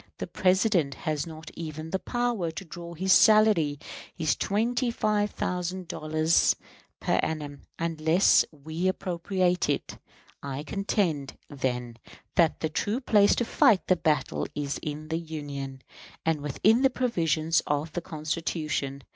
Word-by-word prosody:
The - - -4
President 185 -6 +2
has 155 0 -2
not 160 -1 -9
even 155 -1 -6
the 190 - 0
power 240 -8 -1
to 165 +4 -7
draw 170 +1 -9
his 190 +3 +3
salary 215 -9 +5 0.4
his 160 -3 +1
twenty 240 +5 0
five 210 -2 +1
thousand 180 -1 -3
dollars 155 +1 +2 0.4
per - - +1
annum 150 -3 -4 0.2
unless 165 +2 +3
we 160 +4 -3
appropriate 180 -1 0
it. - - -2 0.4
I 140 +1 -5
contend, 170 -7 -1
then, 125 -4 -3 0.4
that 165 -3 +2
the 160 - +1
true 205 +9 -1
place 210 -6 +4
to 240 - 0
fight 225 -7 +4
the 185 - +4
battle 160 -3 0
is 145 -1 -3
in 155 +1 -5
the 165 0 -1
Union, 140 -5 -6 0.4
and 160 -2 +1
within 205 - +2
the 270 - +5
provisions 165 - +1
of 145 +2 -1
the 175 - -3
Constitution. 155 -4 -3
165 Hz, 140 wpm, -27 LUFS, 150-190 Hz, 0.4 s, salary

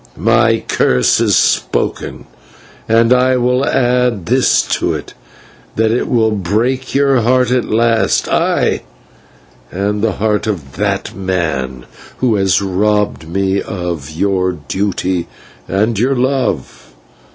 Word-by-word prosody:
My 115 0 +2
curse 65 -1 +2
is - - +3
spoken, - - -1 0.6
and 115 +2 +4
I 130 0 +3
will 125 +2 +1
add 125 -7 +1
to 125 +6 +1
it, - - -8 0.6
that 110 0 +2
it 120 - 0
shall 110 -2 +1
break 110 +8 -1
your 140 -3 +3
heart 125 +1 +2
at 125 -1 +1
last, 115 0 +2
ay! - - +1 0.9
and 100 +3 -2
the 110 -2 +1
heart 105 +1 -1
of 80 -11 -4
that - - -2
man 80 -10 -3 0.3
who 125 -3 +1
has 95 -2 +2
robbed 105 -2 0
me 95 +2 0
of 85 -7 -5
your 95 +3 0
duty 90 +3 -2 0.4
and 105 +3 0
your 130 +4 +1
love." 125 - -2
105 Hz, 120 wpm, -15 LUFS, 95-120 Hz, 0.9 s, and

